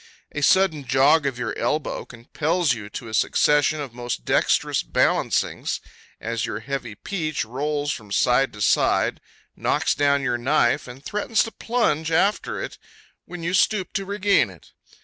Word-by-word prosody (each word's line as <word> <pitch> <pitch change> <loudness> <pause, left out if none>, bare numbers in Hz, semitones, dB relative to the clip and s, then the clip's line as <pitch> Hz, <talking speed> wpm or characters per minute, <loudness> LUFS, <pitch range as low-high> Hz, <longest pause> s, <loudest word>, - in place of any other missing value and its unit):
A 145 - -4
sudden 165 -2 +3
jog 140 +4 +4
of 130 -3 -3
your - - -3
elbow 150 0 -1
compels 150 +6 -1
you 105 -3 -7
to 115 - -7
a 110 - -9
succession 150 +6 +2
of 140 -5 -6
most 120 - -5
dexterous - - +2
balancings - - 0 0.4
as 115 -1 -3
your 110 -1 -3
heavy 125 -4 -5
peach 155 - -3
rolls 145 +5 -2
from 105 -7 -7
side 125 +5 +3
to 105 -1 -4
side, - - +2 0.3
knocks - - +1
down 140 -1 +2
your 125 -3 0
knife, 130 +1 +2
and 125 +3 -11
threatens 210 +1 +1
to 225 - -6
plunge 165 -12 0
after 195 +6 +1
it - - -6 0.5
when 175 -2 -8
you 170 +2 -1
stoop 195 0 +2
to 195 - -1
regain 200 - +2
it. 90 -5 -16
145 Hz, 160 wpm, -23 LUFS, 120-165 Hz, 0.5 s, jog